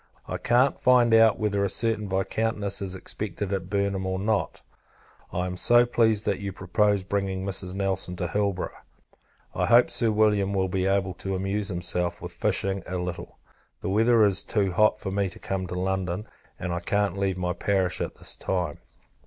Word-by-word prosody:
I - - -4
can't 125 +3 +2
find 125 -2 +4
out 115 -1 +6
whether 100 -2 0
a 100 - +1
certain 110 0 0
Viscountess 100 +1 -1
is 95 -1 -3
expected 100 +1 -4
at 95 -2 -3
Burnham, 100 -1 -1
or 95 0 -1
no. 105 +2 0 0.8
I 90 +1 -1
am 90 - -3 0.4
pleased 110 -3 +2
that 100 - 0
you 100 -1 -4
propose 100 +1 +1
bringing 95 -1 -2
Mrs. 95 -1 -2
Nelson 95 -2 -1
to 90 -1 -2
Hilborough. 100 0 -2 0.7
I 90 0 0
hope, 120 +4 +5
Sir 115 - +3
William 105 -2 +2
will 95 -1 +1
be 95 0 0
able 95 -1 +1
to 95 +2 -4
amuse 95 +2 -2
himself 90 -1 -1
with - - -7
fishing 95 0 0
a 95 - -3
little. 90 -1 -5 0.5
The - - -2
weather 115 +3 +4
is 100 -3 +3
too 100 -3 0
hot 105 +4 +3
for 95 - -4
me 100 0 0
to 90 - -13
come 95 -1 -3
to 90 - -5
London, 95 +2 -2 0.3
and 90 -1 -3
I 85 - -1
can't 100 +2 0
leave 95 -2 -1
my 90 -1 -1
parish 95 -2 0
at - - -3
this - - -5
time. 90 -5 -2
95 Hz, 185 wpm, -26 LUFS, 95-105 Hz, 0.8 s, out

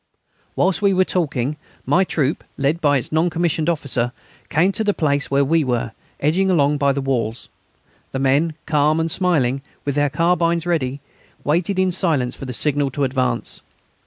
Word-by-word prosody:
Whilst 190 0 +1
we 200 -2 +3
were 185 0 +3
talking, 150 -6 -1 0.3
my 185 - +3
troop, 150 -5 -1
led 145 +5 0
by 145 -3 +3
its 125 - -4
non 160 +3 +2
commissioned 165 -1 0
officer, 135 -7 -1 0.4
came 175 +6 +3
to 220 - -1
the 205 -1 +1
place 145 -3 0
where 140 0 +2
we 160 +3 +2
were, 120 -3 -1 0.3
edging 180 +7 +1
along 145 -4 +2
by 140 -1 +3
the 140 0 -2
walls. 120 -4 -2 0.6
The - - -3
men, 140 +4 +1
calm 155 0 +2
and 165 0 0
smiling, 145 -8 +1 0.2
with 140 - 0
their 145 +1 +1
carbines 170 +2 +1
ready, 140 -6 -1 0.4
waited 170 +6 0
in 185 0 +2
silence 160 -9 0
for - - -8
the 130 - -5
signal 145 +2 +2
to 140 +2 -2
advance. 130 -3 -1
150 Hz, 175 wpm, -20 LUFS, 135-170 Hz, 0.6 s, we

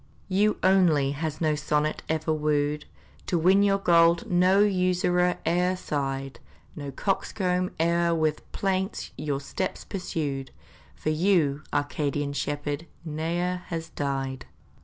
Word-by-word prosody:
You 205 +3 +2
only 170 -8 +4
has 155 +1 -3
no 155 -2 +2
sonnet 150 0 0
ever 160 0 0
wooed, 150 -1 0 0.4
To 175 - +1
win 185 +4 +5
your 200 -1 +4
gold 170 +3 +4
no 180 +2 +4
usurer 180 -2 +2
e'er 180 +2 +2
sighed 135 -5 -3 0.4
No 145 -2 -6
coxcomb 185 - -1
e'er 170 +1 +2
with 155 -2 -1
plaints 190 0 -2
your 145 -1 -2
steps 185 +6 -4
pursued, 145 -8 -3 0.5
For 155 - -2
you, 155 -4 +2
Arcadian 145 0 -1
shepherd 145 +2 -3 0.2
ne'er 170 +3 -1
has 165 -1 -4
died. 135 -2 -3
160 Hz, 120 wpm, -26 LUFS, 145-180 Hz, 0.5 s, win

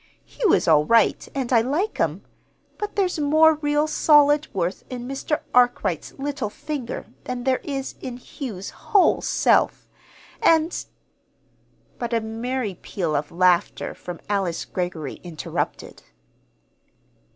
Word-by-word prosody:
Hugh 435 -8 0
is - - +2
all 155 -2 +6
right, 230 +8 +3
and 260 -2 -1
I 230 - +6
like 305 - -1
him; - - 0 0.6
but 420 0 -4
there's 370 -5 0
more 310 +2 +5
real 295 0 +2
solid 295 -1 +4
worth 180 -1 -2
in 245 -1 -6
Mr. 275 +3 -2
Arkwright's 245 0 +2
little 275 -5 -3
finger 275 +1 -5 0.2
than 250 -1 -4
there 260 0 +2
is 275 -2 -4
in 250 -2 -6
Hugh's 230 -7 -7
whole 400 -3 +2
self. - - +2 0.5
And 325 +1 +3 0.5
" - - -38
But 240 -1 -3
a - - +3
merry 225 -2 -3
peal 170 -6 -2
of 145 +1 -2
laughter 180 0 +2
from 175 -2 -8
Alice 195 -5 -1
Greggory 175 -6 -4
interrupted. 170 -4 -5
250 Hz, 130 wpm, -23 LUFS, 190-295 Hz, 0.6 s, all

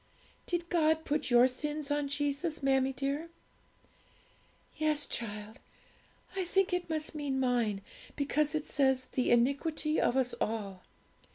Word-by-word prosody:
'Did 345 -1 -1
God 320 -2 +2
put 295 -1 -1
your 240 +1 +7
sins 295 +3 -4
on 290 -1 +1
Jesus, 290 +2 -1
mammie 270 -1 +3
dear?' 280 +5 -3 1.5
'Yes, 305 -1 +1
child; 215 +1 -4 0.8
I 380 - 0
think 375 +1 +1
it 360 -1 -1
must 310 -1 -1
mean 285 -3 -2
mine, 240 -6 +1 0.3
because 300 +1 +1
it 305 -1 -1
says, 265 -2 +2
"the 255 - 0
iniquity 285 +6 +2
of 245 - +2
us 255 -2 +1
all." 200 -4 -2
285 Hz, 130 wpm, -31 LUFS, 255-310 Hz, 1.5 s, your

